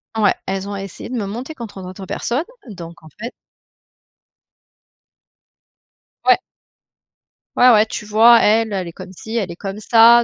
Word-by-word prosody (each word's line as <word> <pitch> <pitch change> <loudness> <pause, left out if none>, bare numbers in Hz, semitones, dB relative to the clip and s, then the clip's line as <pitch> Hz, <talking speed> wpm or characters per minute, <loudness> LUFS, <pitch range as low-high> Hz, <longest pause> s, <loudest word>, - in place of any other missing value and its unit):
Ouais. 210 -3 +3
Elles 195 +1 -3
ont 205 - -4
essayé 195 -2 -8
de 255 - -4
me 220 -4 -2
monter 245 +10 -6
contre 225 -7 -8
d'autres 185 +1 -9
personnes. 245 - -2 0.2
Donc, 170 -4 -10
en 155 - -15
fait 235 +3 -5 2.9
Ouais! - - +6 1.2
Ouais, 250 - +6
ouais. 215 -3 +6
Tu 215 -1 -6
vois 225 +3 +6
elle 220 0 +2
elle 185 -3 -2
est - - -7
comme 185 +2 -11
ci, 220 +5 -8
elle 200 -6 -1
est - - -8
comme 195 +2 -6
ça, 235 +2 +6
210 Hz, 160 wpm, -19 LUFS, 190-230 Hz, 2.9 s, Ouais